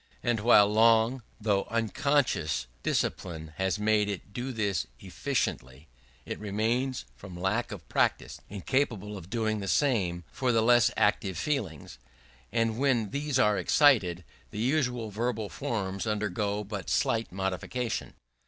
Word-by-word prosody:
But 120 -3 +1
while 105 -3 +7
long, 115 +3 +4 0.2
though 105 -2 +1
unconscious, 115 - 0 0.2
discipline 80 -3 -2
has 95 0 0
made 105 0 +2
it 100 +1 -6
do 125 +4 -3
this 100 -7 -1
efficiently, 65 +5 -3 0.4
it - - -5
remains 115 +5 -1
from 90 -3 -10
lack 105 +6 0
of - - -8
practice, - - 0
incapable 105 -1 -1
of 95 -2 -10
doing 110 -1 -1
the 100 - -5
same 90 - +1
for 130 -1 0
the 115 -1 +3
less 120 0 +5
active 95 -3 +1
feelings; 95 - -3 0.5
and 115 0 0
when 125 -7 +1
these 145 -1 -1
are 105 -5 +3
excited, 100 - +4 0.3
the - - -9
usual 125 -2 0
verbal 110 -1 -2
forms 100 -2 -3
undergo 105 0 -1
but 100 -2 -6
slight 115 -5 +1
modifications. 95 +6 -3
110 Hz, 135 wpm, -29 LUFS, 95-120 Hz, 0.5 s, while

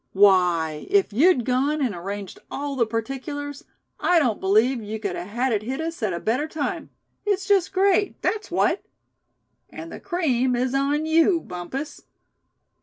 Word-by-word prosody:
Why, 180 -6 +3
if 390 - +2
you'd 265 - +4
gone 275 +4 +1
and 255 -7 0
arranged 195 +2 -6
all 285 0 -4
the 235 -4 +1
particulars, 270 +5 -5 0.3
I 355 - +3
don't 250 -10 +2
believe 220 +6 +3
you 215 +1 -5
could 200 -4 -3
a - - -5
had 240 +5 -1
it 210 - 0
hit 260 +6 -4
us 330 -2 -4
at 215 -3 0
a 170 - -3
better 255 - 0
time. 310 -2 -4 0.3
It's 400 -2 0
just 390 -3 +3
great, 390 +1 +2
that's 425 -1 -1
what." - - +1 0.9
"And 330 0 -9
the - - -8
cream 260 -9 0
is 250 +1 0
on 285 +3 +1
you, 330 +2 +4
Bumpus." 220 - -6
260 Hz, 165 wpm, -24 LUFS, 215-320 Hz, 0.9 s, you'd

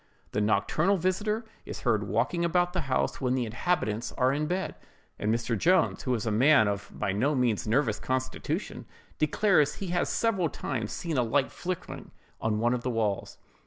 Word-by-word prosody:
The 105 - 0
nocturnal 155 - +2
visiter 210 +5 -1 0.2
is - - -7
heard - - +1
walking 170 -1 0
about 175 +1 +2
the 180 - 0
house 130 - 0
when 130 -1 +1
the 125 -2 0
inhabitants 115 -2 -1
are 130 0 +2
in 150 +2 -1
bed; 185 +3 -2 0.5
and 105 - 0
Mr. 115 0 0
Jones, 180 - +2
who 130 -2 0
is 110 - -3
a 115 - 0
man 125 +1 +5
of 100 0 -3
by 100 - -2
no 130 +10 +1
means 120 -5 +1
nervous 115 -1 +1
constitution, 130 0 -3 0.3
declares 155 -1 +3
he 195 - -5
has 175 0 0
several 195 -8 +1
times 115 -8 -4
seen 165 -6 -2
a - - +4
light 130 +4 +1
flickering 180 -1 -5 0.3
on 110 -1 0
one 120 +3 +2
of 125 - -1
the 125 - -2
walls. 110 -4 -1
130 Hz, 185 wpm, -28 LUFS, 115-175 Hz, 0.5 s, man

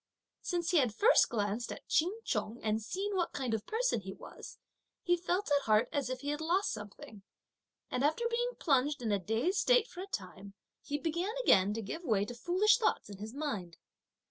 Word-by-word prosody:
Since 345 -2 -1
he 355 - +4
had 250 -7 +2
first 460 - +5
glanced 215 +1 -2
at - - -9
Ch'in 340 +4 +2
Chung, 230 +3 -2
and 220 0 0
seen 390 - -3
what 355 -2 0
kind 255 -5 -2
of 220 -2 -3
person - - 0
he - - -7
was, - - -11 0.5
he 350 - +3
felt 355 +1 -2
at 285 -1 +3
heart 215 0 +3
as 280 -3 -1
if 255 0 -4
he 285 - -3
had 295 +1 -2
lost 355 +5 +1
something, 210 0 -9 0.7
and 250 - -1
after 315 +11 +1
being 485 +1 -1
plunged 275 -1 +1
in 220 - 0
a 200 - +2
dazed 225 - 0
state - - +4
for 360 - -9
a 385 - -6
time, 195 - -7 0.3
he 290 - -3
began 340 +8 -2
again 195 - +5
to 225 - -3
give 325 - -6
way 210 - +1
to 245 - -7
foolish 370 - +3
thoughts 430 - 0
in 195 - -9
his 220 +4 -7
mind. 205 - -4
285 Hz, 205 wpm, -32 LUFS, 215-360 Hz, 0.7 s, first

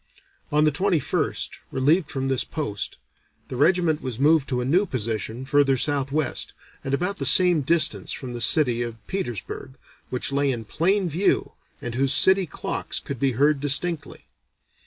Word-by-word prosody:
On 150 +1 +3
the 155 - +3
21st, 175 +1 -1
relieved 150 +5 +2
from 135 -3 -3
this 135 -2 +1
post, 125 -11 -4 0.5
the - - -5
regiment 160 +2 +2
was 125 -4 -5
moved 145 +1 +3
to 125 -2 -1
a 125 - -2
new 180 +9 +2
position 115 - -3
further 135 -1 +3
southwest 140 +2 -1 0.3
and 135 +1 0
about 180 +6 -3
the - - -2
same 180 -4 +5
distance 165 +4 +1
from 125 -2 -5
the 120 - -5
city 125 -3 +3
of 115 -1 -4
Petersburg, 130 - -5 0.4
which 125 +2 -1
lay 140 0 +1
in 115 -3 -5
plain 185 - +1
view 175 +5 0 0.3
and 120 - -4
whose 135 +2 +1
city 190 +3 +4
clocks - - -3
could 140 -4 -7
be 135 -1 +1
heard 145 +4 +2
distinctly. 145 +4 0
140 Hz, 160 wpm, -24 LUFS, 130-165 Hz, 0.5 s, same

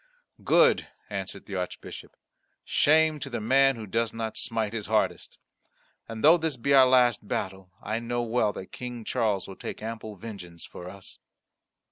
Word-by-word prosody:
"Good," 480 0 +4 0.2
answered - - -5
the - - -9
Archbishop. - - -6 0.5
"Shame 155 0 +4
to 140 - -5
the 120 - -3
man 135 +4 +4
who 110 -2 -7
does 115 +3 -1
not 115 -1 -4
smite 110 -2 -1
his 110 -3 -4
hardest. 110 0 0 0.7
And 110 -1 -7
though 160 +4 +8
this 160 -5 -2
be 140 +4 +1
our 135 -2 +8
last 125 -4 +3
battle, 95 -1 -4
I 110 +1 -2
know 120 +1 -2
well 115 -2 +1
that 95 - -9
King 125 -2 -7
Charles 105 -4 0
will 95 - -10
take - - -7
ample 110 -1 -6
vengeance 90 -5 -9
for 90 - -9
us." 100 0 -11
115 Hz, 165 wpm, -27 LUFS, 105-130 Hz, 0.7 s, though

